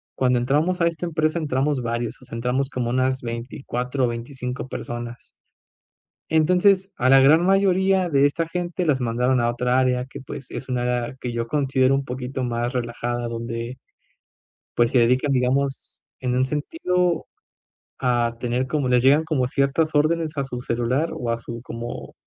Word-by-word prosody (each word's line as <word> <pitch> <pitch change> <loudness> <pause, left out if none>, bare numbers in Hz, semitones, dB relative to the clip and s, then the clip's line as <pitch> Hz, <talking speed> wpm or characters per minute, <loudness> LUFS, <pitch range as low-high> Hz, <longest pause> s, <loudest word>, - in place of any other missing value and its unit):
cuando 125 -1 +2
entramos 150 +9 +1
a 170 - +5
esta 170 +1 -3
empresa, 155 -1 0
entramos 145 -2 0
varios 120 0 -3
o - - -15
sea - - -14
entramos 125 +3 -1
como 120 -2 -2
unas 130 +1 +1
24 125 +2 -3
o - - +1
25 125 +2 -5
personas. 120 -1 -7 1.0
Entonces, 180 +4 +3
a 125 - +1
la 135 - +8
gran 150 +5 +6
mayoría 190 -1 +3
de 140 -1 +4
esta 165 +3 -1
gente, 175 +1 -3
las 140 -4 +2
mandaron 125 +2 +1
a 120 - +2
otra 125 +1 +1
área 125 -1 +1
que, 130 - -10
pues, 135 0 -8
es 135 - -6
un 125 - -1
área 120 0 -1
que 125 - -4
yo 115 0 -3
considero 135 -2 +2
un 135 0 0
poquito 130 +1 -4
más 120 0 -1
relajada, 120 0 -2
donde, 115 +2 -5 1.0
pues, 120 0 +3
se 130 - +4
dedican, 125 +4 +3
digamos, 135 +2 0 0.2
en 125 -1 0
un 130 - +3
sentido 180 - 0 0.7
a 120 -2 +1
tener 125 +1 -1
como 140 0 0
les 125 -1 +4
llegan 145 +4 +5
como 145 -6 0
ciertas 140 +4 +1
órdenes 155 +2 +2
a 140 - +1
su 125 -2 -6
celular 125 +7 0
o 120 - -4
a 115 - -1
su 115 0 -7
como 120 -1 -7
130 Hz, 170 wpm, -23 LUFS, 120-150 Hz, 1.0 s, la